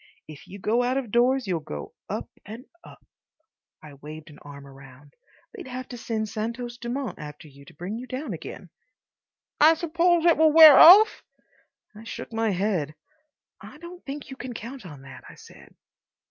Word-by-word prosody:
If 155 -2 -13
you 200 - -10
go 220 +5 0
out 250 +2 -1
of 250 -6 -5
doors, 250 +2 +2
you'll 180 -4 -2
go 75 - -9 0.2
up - - -5 0.2
and 225 +6 -11 0.2
up." - - -16 0.8
I 150 -2 -12
waved 155 +3 -12
an 145 - -16
arm 140 -1 -13
upward. 135 +1 -16 0.4
"They'd 390 -10 -10
have 255 0 -7
to 245 - -8
send 220 -1 -3
Santos 235 +3 -6
Dumont 245 +2 -5
after 150 +1 -10
you 140 -1 -17
to - - -16
bring 185 +8 -6
you 255 - -9
down 255 -3 -6
again." 170 +1 -10 0.9
"I 315 +2 +6
suppose 340 +1 +1
it 335 - +4
will 315 0 +4
wear 310 -2 +9
off?" 410 +6 +8 0.7
I 215 - -12
shook 230 - -9
my 225 0 0
head. 180 -6 -2 0.7
"I - - -13
don't 345 +3 -12
think 280 0 -8
you 265 - -9
can 250 -1 -7
count 235 -2 -9
on 145 -5 -13
that," 135 0 -13
I - - -14
said. - - -17
230 Hz, 180 wpm, -24 LUFS, -, 0.9 s, wear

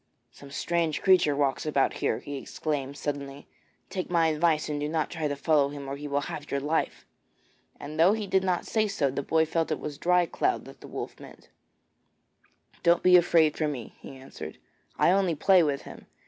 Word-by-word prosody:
'Some 140 +3 -14
strange 165 +2 -1
creature 180 -6 +4
walks 140 -2 0
about 145 -3 +1
here,' - - +1
he 145 -1 -6
exclaimed 140 0 -4
suddenly. 140 -1 -5 0.5
'Take 185 - -4
my 165 -2 +3
advice 155 0 +1
and 150 -1 -3
do 150 +1 -2
not 160 -1 -1
try 160 -3 -2
to 145 - -2
follow 145 -1 +2
him 140 -1 -8
or 135 - -4
he 145 +1 -7
will 140 0 0
have 145 +1 -7
your 140 - -1
life.' 150 +4 -2 0.7
And 155 +2 -7
though 175 +5 +6
he 215 -1 -2
did 190 -1 +1
not 180 -2 0
say 215 -1 +1
so, 155 -10 0
the 140 - -2
boy 160 +3 +2
felt 165 +1 -1
it 155 - -1
was 145 -2 -6
Dry 180 0 +3
cloud 375 - -1
that - - -14
the - - -10
wolf - - -7
meant. - - -14 1.3
'Don't 170 0 +3
be 180 0 +7
afraid 165 -3 +4
for 155 - 0
me,' 130 -6 -6
he 135 - -11
answered; 105 -12 -9 0.4
'I - - +4
only 190 -3 +2
play 185 +4 +5
with 145 -4 0
him. - - -12
155 Hz, 205 wpm, -27 LUFS, 140-175 Hz, 1.3 s, be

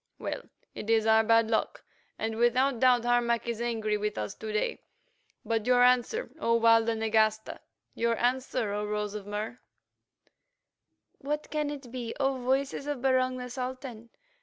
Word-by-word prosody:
Well, - - -4 0.3
it 210 - -7
is 225 -1 +3
our 220 0 +5
bad 230 0 +3
luck, 220 - -1 0.3
and 220 0 -3
without 245 +2 +2
doubt 245 -2 +4
Harmac 240 -1 +1
is 235 -1 -3
angry 220 -3 -1
with 210 0 -2
us 105 -1 -3
to 220 - -7
day. 210 - -1 0.6
But 225 0 -1
your 250 0 +5
answer, 250 - +2
O 230 -5 +2
Walda 230 0 +4
Nagasta, 220 0 +1 0.3
your 230 0 0
answer, 250 -3 0
O 210 0 -2
Rose 210 0 -3
of 205 -2 -7
Mur?" 210 +4 -4 1.6
"What 295 +2 -4
can 300 -1 -1
it 275 -4 -8
be, 240 -2 -5
O 270 -1 +1
Voices 270 +3 -1
of 285 -4 -3
Barung 255 -1 +2
the 250 0 -6
Sultan?" 250 -2 -6
235 Hz, 160 wpm, -29 LUFS, 220-255 Hz, 1.6 s, our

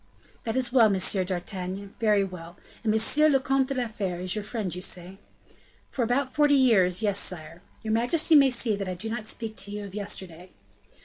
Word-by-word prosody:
"That 225 - -2
is 255 -1 0
well, 235 -4 +6
M. 195 - +1 0.3
d'Artagnan, 185 +2 -5
very 210 -3 +3
well! 175 -2 -8 0.3
And 220 - +1
M. 295 +8 +4
le 270 - +4
Comte 270 0 +1
de 275 - -3
la 250 -2 -1
Fere 195 -5 -4
is 180 0 -1
your 210 - -3
friend, 210 -4 -4
say 180 -2 -3
you?" 190 +1 -12 0.7
"For 260 - -4
about 250 +3 0
forty 295 -1 +4
years; 220 -8 +3
yes, 200 -2 +1
sire. 165 -1 -5 0.2
Your 220 -1 -1
majesty 300 +9 +2
may 280 -3 +7
see 235 -3 0
that 195 -2 -4
I 185 - -3
do 220 +5 -6
not 220 -2 -5
speak 220 -1 -5
to 200 - -4
you 205 0 -5
of 195 - -10
yesterday." 190 -4 -5
215 Hz, 205 wpm, -26 LUFS, 185-245 Hz, 0.7 s, may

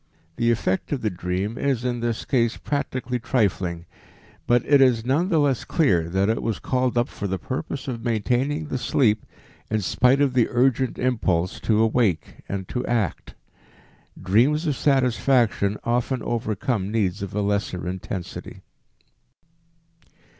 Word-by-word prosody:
The 115 - +2
effect 105 -5 0
of 140 -4 -1
the 110 - 0
dream 90 +6 -3
is 130 -4 0
in 120 -1 -1
this 115 -1 -2
case 120 -3 +1
practically 130 -3 -3
trifling, 95 -8 -1 0.6
but 120 0 +3
it 145 -2 +5
is 120 -4 +4
none 150 +9 +1
the 165 - +2
less 140 -5 +2
clear 90 - +1
that 95 +3 +1
it 110 - 0
was 115 -4 -1
called 130 -1 -1
up 120 - +2
for 100 - -5
the 95 0 -2
purpose 130 +6 -5
of 120 -3 -4
maintaining 125 +7 0
the 130 -3 -3
sleep 110 -5 +2 0.5
in 110 0 0
spite 125 +7 +3
of 140 -3 +2
the 125 -3 +3
urgent 130 0 +1
impulse 95 -8 0
to 110 0 +2
awake 110 -8 0
and 95 -2 -4
to 125 - -2
act. 110 -8 -2 0.8
Dreams 125 - +2
of 150 -3 0
satisfaction 125 -6 +2
often 125 +2 -1
overcome 110 -2 -2
needs 100 -4 0
of 100 0 -5
a 105 - +1
lesser 100 -3 -1
intensity. 90 0 -6
115 Hz, 150 wpm, -24 LUFS, 100-130 Hz, 0.8 s, it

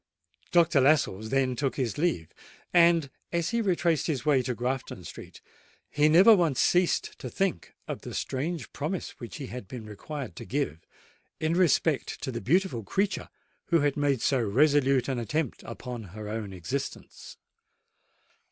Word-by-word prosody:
Dr. 170 -4 +4
Lascelles 130 -7 +2
then 130 -1 +1
took 135 +1 -1
his 125 -6 -1
leave; 150 - -1 0.4
and, 170 -5 +5 0.2
as 170 +1 0
he 235 0 +1
retraced 175 -6 +1
his 150 -5 -2
way 145 -4 +4
to 125 0 -3
Grafton 125 -5 -3
Street, - - -10 0.5
he 150 +1 +3
never 190 +8 +8
once 165 -8 +1
ceased 180 0 +2
to - - -6
think 195 -2 -2
of - - -5
the - - -7
strange 160 +6 -3
promise 160 +6 -3
which 120 - -8
he 145 - -6
had 125 -5 -7
been 115 +1 -8
required 130 +7 -7
to - - -6
give 135 - -2 0.6
in 155 +1 0
respect 165 -4 +2
to 130 - -2
the 115 - -4
beautiful 160 - +1
creature 195 - -1 0.4
who 170 -3 +3
had 145 -1 +1
made 140 -4 +1
so 135 - +2
resolute 135 +3 +3
an 130 -3 -1
attempt 140 +3 -2
upon 120 0 -6
her 105 +3 -8
own 105 -2 -4
existence. 95 +10 -6
140 Hz, 160 wpm, -28 LUFS, 120-165 Hz, 0.6 s, never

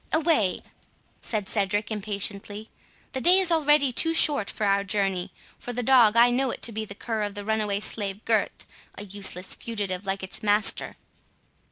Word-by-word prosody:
"Away!" 310 - +1 0.6
said 210 -4 -3
Cedric, 205 0 -1
impatiently; 205 0 -4 0.4
"the 260 - -4
day 355 +5 +5
is 375 -2 +1
already 295 -4 +3
too 325 +6 0
short 285 -10 +3
for 215 - -3
our 200 0 +2
journey. 195 -2 -1 0.3
For 245 - -6
the 245 +1 -2
dog, 235 -3 +5
I 240 +1 +6
know 260 +2 +1
it - - -6
to 235 - -1
be 220 0 -4
the 200 - -10
cur 225 0 -3
of 205 -1 -3
the 205 0 -6
runaway 210 -2 -1
slave 205 -1 -4
Gurth, 220 -3 0 0.3
a 205 - -8
useless 190 -2 -4
fugitive 205 -5 -4
like 195 0 -2
its 190 - -9
master." 210 0 +1
215 Hz, 175 wpm, -26 LUFS, 200-245 Hz, 0.6 s, I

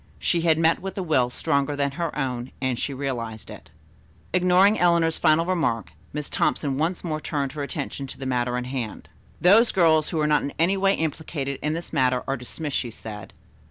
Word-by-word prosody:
She 170 - 0
had 165 -2 +3
met 165 0 +3
with 195 +1 -6
a 190 - -1
will 130 -7 +2
stronger 140 +3 0
than 140 -1 0
her 165 +1 -3
own 125 -3 -3
and 130 -2 -1
she - - -2
realized 120 -5 -4
it. - - -12 0.6
Ignoring 180 +3 +4
Eleanor's 170 -2 +3
final 155 +2 +4
remark, 140 - 0 0.2
Miss 150 0 -4
Thompson 140 -2 0
once 170 +3 -1
more 155 -3 -3
turned 140 -4 -2
her 150 - -6
attention 140 -1 -4
to - - -9
the 135 - -7
matter 125 -1 0
in 125 - -2
hand. 125 -4 -5 0.3
"Those 215 +6 +6
girls 160 -4 +3
who 160 - -2
are 150 - +2
not 150 0 +3
in 140 - -4
any 170 +4 +3
way 195 0 +3
implicated 150 -3 -3
in 150 +1 0
this 165 +1 -5
matter 130 -3 +2
are 135 - 0
dismissed," 140 +3 -4
she 120 - -3
said. 105 -3 -9
150 Hz, 200 wpm, -24 LUFS, 130-165 Hz, 0.6 s, Those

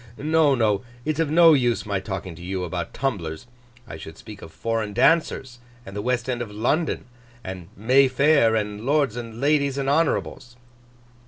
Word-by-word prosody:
No, 155 -1 +3
no, 105 -5 +1 0.2
it's 155 0 -1
of 165 -3 +1
no 165 +1 +7
use 120 -5 +1
my 100 -2 -1
talking 95 -2 -6
to 80 - -13
you 90 +1 -3
about 85 -1 -4
tumblers. 85 - -3 0.4
I 80 - -8
should 80 0 -10
speak 105 -2 -11
of 80 - -11
foreign 110 0 -3
dancers, 130 -1 +1 0.3
and 95 - -10
the 105 - -3
West 125 +1 -1
End 125 -2 -2
of 120 - -5
London, 125 +10 -1 0.4
and 95 -2 -7
May 130 +6 +4
Fair, 130 -3 +3
and 105 -1 -3
lords 140 -3 +1
and 115 -2 -7
ladies 140 -1 +1
and 135 -1 -2
honourables. 140 -4 0
120 Hz, 175 wpm, -23 LUFS, 100-140 Hz, 0.4 s, no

